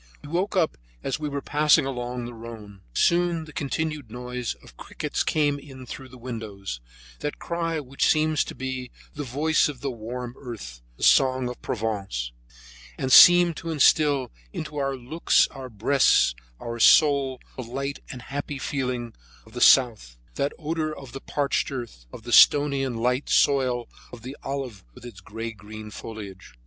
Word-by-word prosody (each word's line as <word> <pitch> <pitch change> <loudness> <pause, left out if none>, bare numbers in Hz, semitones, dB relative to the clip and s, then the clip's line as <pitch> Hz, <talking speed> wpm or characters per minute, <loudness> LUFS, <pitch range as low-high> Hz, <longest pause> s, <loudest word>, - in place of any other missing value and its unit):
We 145 - -9
woke 185 +6 -1
up 160 - +1 0.2
as 135 - -2
we 150 -1 -3
were 140 -1 -4
passing 150 0 +4
along 125 -2 -4
the 120 - -7
Rhone. 110 -4 -10
Soon 170 - +2
the 155 - -13
continued 150 -2 -3
noise 125 +1 -4
of - - -18
crickets - - -3
came 145 -2 +1
in 135 -2 -11
through 130 +1 -9
the 125 - -13
windows, 110 - -6 0.4
that 150 - -4
cry 165 -1 -2
which 135 -1 -1
seems 155 -1 +3
to - - -8
be 130 -1 -4 0.2
the 145 - -5
voice 150 +5 +2
of 135 -4 -8
the 140 - -2
warm 120 +1 -6
earth, 105 - -8 0.2
the - - -8
song 130 -1 +4
of 125 - -7
Provence; 100 - -3 0.7
and 130 - -2
seemed 175 +2 +9
to 165 - -6
instill 145 -3 +3 0.2
into 150 - -6
our 135 -1 -1
looks, 130 +7 +2
our 130 -2 -9
breasts, 120 - +3 0.3
and - - -9
our 115 0 -4
souls 140 -1 +5 0.2
the - - -5
light 135 +4 -4
and 125 -2 -8
happy 145 +1 -5
feeling 125 -4 -3 0.3
of 110 - -18
the 120 - -5
south, 110 - +5 0.2
that 140 +1 -1
odor 155 -1 -3
of 135 -3 -10
the 135 +2 -8
parched 140 0 -1
earth, 115 - -7
of - - -10
the - - -4
stony 145 -2 +6
and 125 -4 -3
light 125 +4 0
soil 130 -4 +2 0.2
of 120 -2 -11
the 130 +3 -7
olive 135 -7 -5
with - - -13
its 115 -6 -10
gray 115 +4 -6
green 105 0 -10
foliage. 100 - -9
130 Hz, 175 wpm, -25 LUFS, 115-145 Hz, 0.7 s, seemed